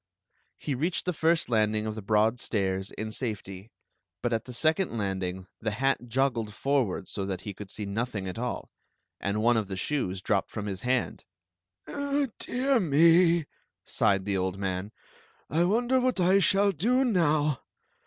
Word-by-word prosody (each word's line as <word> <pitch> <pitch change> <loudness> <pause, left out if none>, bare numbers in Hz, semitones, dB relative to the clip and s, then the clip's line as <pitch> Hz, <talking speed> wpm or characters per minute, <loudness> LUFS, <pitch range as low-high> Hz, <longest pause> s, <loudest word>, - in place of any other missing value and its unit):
He 145 - -3
reached 160 +8 -1
the 180 - 0
first 165 +1 +2
landing 110 -2 +1
of 110 - -2
the 110 - -6
broad 110 +3 +2
stairs 95 -3 -1
in 110 +1 -5
safet/, 105 -4 -5 0.5
but 120 - +1
at 115 - -1
the 125 - -8
second 155 +2 +1
landing 95 -2 -2
the 110 - -1
hat 135 -1 +1
joggled 115 -4 0
for 140 -1 +2
ward 95 -1 -5
so 100 - -3
that 95 -2 -3
he 100 - -6
could 100 0 -9
see 105 +1 -5
nothing 100 -1 -3
at 95 +4 -5
all, 125 0 -4 0.5
and 105 +2 -1
one 120 0 +4
of 110 -3 -1
the 95 -1 -5
shoes 95 -4 -1
dropped 100 +1 0
from 105 -2 -5
his 95 -2 -4
hand. 125 -1 -1 0.6
" 285 -3 -2
Dear 260 +1 +1
me! 170 0 +5 0.2
" - - -55
sighed 100 -1 +1
the 100 -1 0
old 95 0 -1
man; 95 +1 -3 0.3
" - - -33
I 165 +3 +3
wonder 240 +7 +2
what 255 -4 +1
I 185 +2 +5
shall 200 +1 +4
do 235 - +2
now? 155 - +2
120 Hz, 180 wpm, -28 LUFS, 100-165 Hz, 0.6 s, me